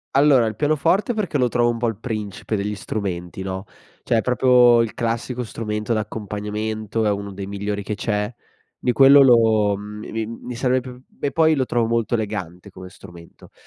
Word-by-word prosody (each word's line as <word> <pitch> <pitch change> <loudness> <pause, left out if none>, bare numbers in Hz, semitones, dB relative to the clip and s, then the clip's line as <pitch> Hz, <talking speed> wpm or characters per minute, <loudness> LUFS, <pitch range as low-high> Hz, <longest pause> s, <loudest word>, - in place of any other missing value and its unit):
Allora, 135 -4 +5
il 110 -1 -3
pianoforte, 155 - +1
perché 205 -9 -1
lo 125 -2 +2
trovo 120 0 +1
un 120 - -1
po' 120 +1 -1
il 115 - -2
principe 110 -1 -4
degli 105 +1 -3
strumenti, 95 -3 -5
no, 95 0 -4 0.4
cioè 115 - +1
proprio 125 -1 +5
il 115 -3 -2
classico 120 +2 -3
strumento 105 +1 -3
d'accompagnamento, 110 +1 -3
è 105 - +3
uno 100 0 -4
dei 95 0 -7
migliori 100 +1 -3
che 105 +1 -4
c'è 105 -1 -2 0.5
di 125 - 0
quello 135 +2 +7
lo 110 -5 +5
uhm, 100 - -4 0.2
mi 105 - -9
mi 110 0 -2
mi 115 +2 -8
sarebbe 125 0 -1 0.2
p - - -28
e 140 - 0
poi 160 -1 +3
lo 130 -3 0
trovo 120 -2 0
molto 115 0 0
elegante 100 -4 -5
come 95 -1 -11
strumento, 85 -2 -15
110 Hz, 185 wpm, -21 LUFS, 105-125 Hz, 0.5 s, quello